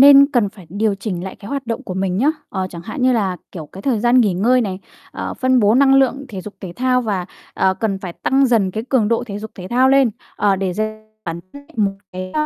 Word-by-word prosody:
nên 280 Hz, 0 st, +9 dB
cần 230 Hz, -6 st, +3 dB
phải 195 Hz, -5 st, -15 dB
điều 205 Hz, +3 st, 0 dB
chỉnh 195 Hz, -3 st, -4 dB
lại 190 Hz, -, -7 dB
cái 200 Hz, -, -11 dB
hoạt 275 Hz, -2 st, -3 dB
động 230 Hz, -1 st, -3 dB
của 185 Hz, -, -5 dB
mình 190 Hz, -1 st, -1 dB
nhá. 280 Hz, +6 st, +3 dB, 0.2 s
Ờ, 190 Hz, -1 st, -2 dB
chẳng 170 Hz, -1 st, -8 dB
hạn 225 Hz, +4 st, -5 dB
như 255 Hz, 0 st, +4 dB
là, 195 Hz, -6 st, 0 dB, 0.2 s
kiểu, 160 Hz, -4 st, -7 dB
cái 195 Hz, +6 st, -11 dB
thời 245 Hz, -6 st, +1 dB
gian 240 Hz, +2 st, +5 dB
nghỉ 205 Hz, -6 st, +2 dB
ngơi 245 Hz, +7 st, +3 dB
này, 190 Hz, -4 st, -2 dB, 0.3 s
ờ, -, -, -5 dB
phân 255 Hz, -1 st, +2 dB
bố 210 Hz, +2 st, +4 dB
năng 270 Hz, +1 st, +5 dB
lượng, 270 Hz, +1 st, +3 dB
thể 195 Hz, -3 st, -6 dB
dục 210 Hz, +2 st, -9 dB
thể 185 Hz, -4 st, -7 dB
thao 250 Hz, 0 st, +2 dB
và, 195 Hz, -5 st, -2 dB, 0.3 s
ờ, 190 Hz, 0 st, +2 dB
cần 195 Hz, -1 st, -1 dB
phải 180 Hz, -3 st, -6 dB
tăng 270 Hz, +7 st, +2 dB
dần 215 Hz, -6 st, +2 dB
cái 220 Hz, +4 st, -4 dB
cường 235 Hz, -6 st, +2 dB
độ 235 Hz, +1 st, +1 dB
thể 205 Hz, -1 st, -5 dB
dục 220 Hz, +1 st, -7 dB
thể 185 Hz, 0 st, -8 dB
thao 255 Hz, +2 st, +4 dB
lên, 270 Hz, -3 st, +5 dB, 0.3 s
ờ, 200 Hz, -2 st, +2 dB
để 190 Hz, -1 st, -1 dB
dành 215 Hz, +2 st, -5 dB
bản 170 Hz, 0 st, -4 dB
thân 285 Hz, 0 st, -12 dB
một 200 Hz, -2 st, +2 dB, 0.2 s
cái 185 Hz, 0 st, -6 dB
215 Hz, 260 wpm, -19 LUFS, 190-250 Hz, 0.3 s, nên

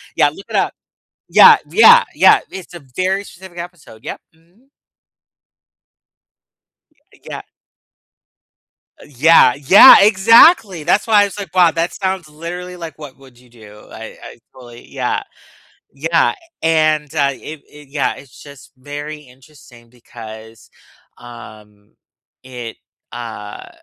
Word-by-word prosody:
yeah, 145 Hz, -, +2 dB
look 195 Hz, +7 st, -14 dB
it -, -, -6 dB
up. -, -, -1 dB, 0.6 s
Yeah, -, -, +7 dB
yeah, 475 Hz, +2 st, +6 dB
yeah, -, -, +4 dB
it's 185 Hz, -2 st, -11 dB
a 175 Hz, -, -10 dB, 0.2 s
very 190 Hz, +2 st, -2 dB
specific 185 Hz, -2 st, -15 dB
episode, 170 Hz, -10 st, -12 dB
yep, -, -, -8 dB
mhm. 175 Hz, +11 st, -32 dB, 2.4 s
Y -, -, -24 dB
yeah. -, -, -9 dB, 1.6 s
Uh, -, -, -15 dB
yeah, 145 Hz, -1 st, +3 dB
yeah, 145 Hz, +8 st, +7 dB
exactly, 210 Hz, -, +4 dB
that's 200 Hz, -, 0 dB
why 215 Hz, -2 st, +4 dB
I -, -, +2 dB
was, 200 Hz, -, -9 dB
like, 195 Hz, -5 st, -9 dB
"Wow, 175 Hz, -2 st, +4 dB
that 165 Hz, +1 st, -3 dB
sounds 190 Hz, -3 st, -4 dB
literally, 175 Hz, +4 st, -9 dB
like, 165 Hz, -2 st, -10 dB
'What 145 Hz, -4 st, -13 dB
Would 130 Hz, -3 st, -20 dB
You 125 Hz, 0 st, -23 dB
Do.'" 110 Hz, -3 st, -17 dB
I 110 Hz, 0 st, -11 dB
I -, -, -13 dB, 0.2 s
totally 120 Hz, -2 st, -16 dB
yeah. -, -, -4 dB, 0.7 s
Yeah, 160 Hz, -, -1 dB, 0.3 s
and, 155 Hz, -2 st, 0 dB
uh, 140 Hz, -1 st, 0 dB
it 150 Hz, +2 st, -11 dB
it 150 Hz, -1 st, -17 dB
yeah, 140 Hz, 0 st, -3 dB
it's 135 Hz, -3 st, -17 dB
just 140 Hz, -3 st, -16 dB
very 145 Hz, +3 st, -9 dB
interesting 125 Hz, -3 st, -20 dB
because, 110 Hz, -2 st, -14 dB, 0.5 s
um, 105 Hz, -4 st, -16 dB, 0.5 s
it, 120 Hz, -3 st, -10 dB, 0.4 s
uh 110 Hz, -3 st, -10 dB
150 Hz, 130 wpm, -16 LUFS, 120-180 Hz, 2.4 s, Yeah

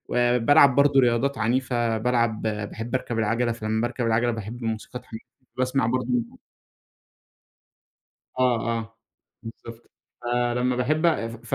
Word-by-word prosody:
آآ، 120 Hz, 0 st, +3 dB
بالعب 135 Hz, +2 st, +5 dB
برضو 140 Hz, 0 st, +4 dB
رياضات 125 Hz, +3 st, +2 dB
عنيفة، 120 Hz, 0 st, 0 dB
بالعب 115 Hz, -1 st, 0 dB
باحب 110 Hz, +3 st, -4 dB
أركب 120 Hz, -2 st, -2 dB
العجلة، 115 Hz, +2 st, +1 dB
فلمّا 110 Hz, -1 st, -2 dB
باركب 120 Hz, +1 st, -2 dB
العجلة 120 Hz, +1 st, +2 dB
باحب 115 Hz, +2 st, -6 dB
موسيقى 115 Hz, +2 st, -4 dB
تحمسني، 115 Hz, -3 st, -11 dB, 0.3 s
باسمع 130 Hz, -1 st, +1 dB
برضو 125 Hz, 0 st, -1 dB, 2.1 s
آه 120 Hz, -2 st, +1 dB
آه، 115 Hz, 0 st, -9 dB, 0.5 s
بالضبط، 115 Hz, 0 st, -11 dB, 0.3 s
فلمّا 120 Hz, +1 st, 0 dB
باحبّ 155 Hz, +7 st, +1 dB, 0.4 s
ف 115 Hz, -, -2 dB
120 Hz, 120 wpm, -24 LUFS, 115-125 Hz, 2.1 s, بالعب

